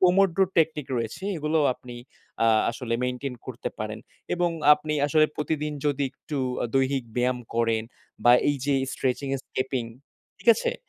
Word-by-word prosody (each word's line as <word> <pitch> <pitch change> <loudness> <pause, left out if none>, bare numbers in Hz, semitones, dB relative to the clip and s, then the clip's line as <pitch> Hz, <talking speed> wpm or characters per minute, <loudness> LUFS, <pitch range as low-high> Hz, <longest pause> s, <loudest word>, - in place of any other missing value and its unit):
পোমোড্র 185 -1 +4 0.2
technique 155 -3 +2
রয়েছে, 115 - -4
এগুলোও 155 0 +1
আপনি 120 -1 -11 0.5
আ - - +5 0.2
আসলে 115 -1 -3
মেইনটেইন 125 +1 -3
করতে - - -4
পারেন। - - -4 0.4
এবং 175 -1 +1 0.2
আপনি 150 +1 -4
আসলে 155 +1 +4
প্রতিদিন 150 0 -2
যদি 145 -1 +1
একটু 150 - -6 0.4
দৈহিক 135 -1 +2
ব্যায়াম 125 0 +1 0.2
করেন 115 -1 +1 0.4
বা 120 - +8 0.2
এইযে 140 0 0 0.2
স্ট্রেচিং 135 +2 -1
এ - - -6
স্কেপিং, 130 -2 -2 0.5
ঠিক - - -4
আছে, 475 - -1
এ - - -9
140 Hz, 150 wpm, -26 LUFS, 125-155 Hz, 0.5 s, বা